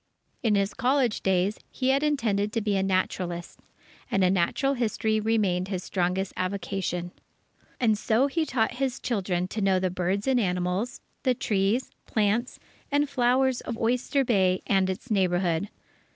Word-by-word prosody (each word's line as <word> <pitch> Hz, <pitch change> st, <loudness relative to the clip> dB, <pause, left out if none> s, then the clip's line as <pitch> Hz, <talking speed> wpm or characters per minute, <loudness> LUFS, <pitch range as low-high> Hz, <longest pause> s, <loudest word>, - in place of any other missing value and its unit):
In 220 Hz, -4 st, +2 dB
his 200 Hz, 0 st, +1 dB
college 255 Hz, -3 st, +1 dB
days, 190 Hz, +2 st, +1 dB
he 260 Hz, -1 st, -1 dB
had 270 Hz, +1 st, +3 dB
intended 225 Hz, -9 st, +1 dB
to 230 Hz, -, +1 dB
be 205 Hz, -1 st, 0 dB
a 190 Hz, -, +2 dB
naturalist, 185 Hz, -2 st, -2 dB, 0.5 s
and 190 Hz, -1 st, +3 dB
natural 195 Hz, +10 st, +1 dB
history 220 Hz, -3 st, 0 dB
remained 205 Hz, -5 st, +1 dB
his 185 Hz, -2 st, -3 dB
strongest 185 Hz, +1 st, -1 dB
avocation. 185 Hz, -2 st, -3 dB, 0.7 s
And 225 Hz, -4 st, +3 dB
so 225 Hz, +4 st, +2 dB
he 300 Hz, +4 st, 0 dB
taught 240 Hz, -7 st, 0 dB
his 265 Hz, -1 st, 0 dB
children 185 Hz, -6 st, -1 dB
to 215 Hz, -, -3 dB
know 195 Hz, -1 st, +3 dB
the 185 Hz, -1 st, 0 dB
birds 185 Hz, +3 st, -1 dB
and 265 Hz, -2 st, +3 dB
animals, 180 Hz, +3 st, -1 dB, 0.2 s
the 255 Hz, -2 st, +2 dB
trees, 210 Hz, +4 st, 0 dB, 0.2 s
plants, 220 Hz, +3 st, 0 dB, 0.3 s
and 290 Hz, +1 st, +2 dB
flowers 260 Hz, -1 st, +2 dB
of 230 Hz, -, -5 dB
Oyster 250 Hz, +4 st, +1 dB
Bay 190 Hz, -6 st, +2 dB
and 190 Hz, -1 st, +2 dB
its 205 Hz, +6 st, -5 dB
neighbourhood. 180 Hz, -2 st, +1 dB
205 Hz, 150 wpm, -27 LUFS, 185-245 Hz, 0.7 s, had